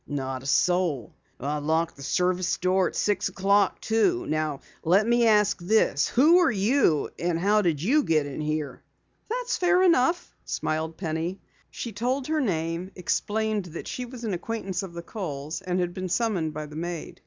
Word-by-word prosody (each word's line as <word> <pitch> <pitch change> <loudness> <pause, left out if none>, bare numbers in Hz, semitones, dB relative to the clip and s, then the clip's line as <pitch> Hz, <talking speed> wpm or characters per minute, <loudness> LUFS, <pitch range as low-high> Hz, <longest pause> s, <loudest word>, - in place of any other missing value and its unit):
"Not 130 -2 -3
a 135 - -8
soul. 170 - +1 0.3
I 145 +3 -2
locked 160 +2 0
the 140 - -13
service 180 +5 0
door 185 0 +2
at - - -7
six 205 -1 +1
o'clock, 200 +1 +2
too. 290 +12 +1
Now 155 -2 -2 0.2
let 185 +6 +4
me 235 0 +3
ask 210 -3 +3
this: 175 -5 +2
Who 315 +8 +5
are 350 - +4
you, 205 - +2
and 170 -1 0
how 205 +5 +3
did 165 -6 0
you 280 +10 +4
get 155 - +1
in 145 +1 -5
here?" 155 -1 -3 0.5
"That's - - -1
fair 365 0 +3
enough," 335 -1 +2
smiled 160 +1 -3
Penny. 165 +2 -3 0.3
She 235 - -6
told 250 +6 -1
her 310 +1 0
name, 165 - -2
explained 210 +2 -1
that 170 -1 -8
she 250 - -4
was 245 -1 -10
an 215 -4 -2
acquaintance 195 0 -3
of 190 -3 -8
the 170 - -6
Kohls, 155 -5 -5
and 185 -1 -1
had 175 -1 -1
been 185 0 -4
summoned 185 -6 0
by 155 0 -5
the 150 0 -11
maid. 170 0 -5
185 Hz, 180 wpm, -26 LUFS, 160-225 Hz, 0.5 s, Who